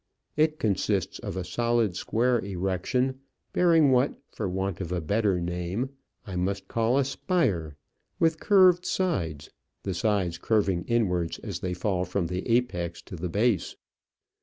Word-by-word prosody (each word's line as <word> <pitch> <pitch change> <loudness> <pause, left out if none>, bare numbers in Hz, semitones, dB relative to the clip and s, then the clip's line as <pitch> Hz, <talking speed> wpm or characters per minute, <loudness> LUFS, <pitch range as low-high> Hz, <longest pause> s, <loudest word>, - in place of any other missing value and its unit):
It 155 0 +2
consists 100 - 0
of 95 - -5
a 95 - -2
solid 115 +1 +1
square 120 +6 +1
erection, 95 +7 -1 0.3
bearing 165 -5 +5
what, 130 +2 +3 0.2
for - - -3
want 95 0 -2
of 90 -2 -5
a 90 - 0
better 100 +3 +1
name, 90 +8 -2 0.3
I 95 -4 -6
must 95 +2 -2
call 115 +4 +1
a 140 - +3
spire, 110 - 0 0.4
with 160 -1 +2
curved 185 -3 +5
sides, 85 - -1 0.3
the 95 - -2
sides 90 -2 0
curving 95 -4 +1
inwards 90 -8 +1
as - - -4
they 90 -1 -3
fall 90 0 0
from 90 0 -1
the 90 +5 -4
apex 90 -8 0
to - - -9
the 90 +1 -4
base. 105 +1 +1
100 Hz, 150 wpm, -27 LUFS, 90-125 Hz, 0.4 s, bearing